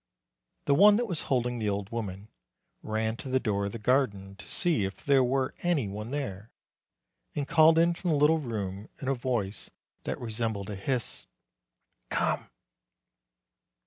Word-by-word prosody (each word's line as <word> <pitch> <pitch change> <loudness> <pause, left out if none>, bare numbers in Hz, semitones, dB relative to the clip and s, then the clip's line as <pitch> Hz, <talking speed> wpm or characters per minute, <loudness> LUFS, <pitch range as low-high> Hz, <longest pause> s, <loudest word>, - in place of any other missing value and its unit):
The 140 - +3
one 205 +7 +7
that 240 +3 +1
was 175 -8 -2
holding 125 -2 +1
the 105 -2 0
old 100 +1 -3
woman 105 -3 -5 0.5
ran 110 +1 -2
to 135 - -7
the 130 0 +2
door 100 -5 -1
of - - -5
the 115 - -5
garden 105 -5 0
to 105 - -11
see 170 - +1
if 95 0 -5
there 140 -2 +5
were 130 +1 0
any 170 -10 +1
one 105 +3 -6
there, 115 -7 -4 0.9
and 145 -2 -2
called 160 0 +6
in 170 +1 +4
from 175 +1 -3
the 155 - +3
little 150 +3 +4
room, 105 -6 -4
in 135 - -6
a 135 - +3
voice 120 -6 -2 0.4
that - - -3
resembled 110 -3 -2
a - - -4
hiss, 120 +5 -3 0.8
"Come!" - - 0
120 Hz, 165 wpm, -29 LUFS, 105-140 Hz, 0.9 s, one